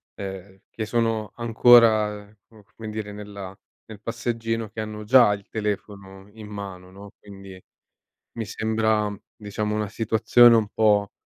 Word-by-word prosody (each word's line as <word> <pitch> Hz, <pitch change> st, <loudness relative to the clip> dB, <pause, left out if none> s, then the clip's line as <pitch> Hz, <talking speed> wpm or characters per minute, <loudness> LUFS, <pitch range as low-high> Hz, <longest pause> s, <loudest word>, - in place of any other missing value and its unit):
ehm, 95 Hz, 0 st, -8 dB
che 110 Hz, -, -5 dB
sono 115 Hz, -2 st, -1 dB
ancora 110 Hz, -3 st, +4 dB, 0.2 s
co 110 Hz, -2 st, -19 dB
come 110 Hz, -1 st, -8 dB
dire 105 Hz, -1 st, -6 dB
nella 100 Hz, -2 st, -9 dB, 0.3 s
nel 110 Hz, -1 st, -12 dB
passeggino 115 Hz, -1 st, -3 dB
che 110 Hz, +1 st, -6 dB
hanno 105 Hz, 0 st, -7 dB
già 120 Hz, -1 st, +6 dB
il 100 Hz, -1 st, -8 dB
telefono 100 Hz, -2 st, -6 dB
in 110 Hz, -2 st, -11 dB
mano, 95 Hz, -3 st, -8 dB
no, 100 Hz, +1 st, -13 dB
quindi, 95 Hz, -2 st, -12 dB, 0.8 s
mi 115 Hz, -, -4 dB
sembra 110 Hz, 0 st, -1 dB, 0.2 s
diciamo 105 Hz, 0 st, -4 dB
una 105 Hz, -1 st, -2 dB
situazione 115 Hz, +3 st, +4 dB
un 110 Hz, -2 st, +2 dB
po' 105 Hz, -2 st, +2 dB
105 Hz, 140 wpm, -24 LUFS, 100-110 Hz, 0.8 s, già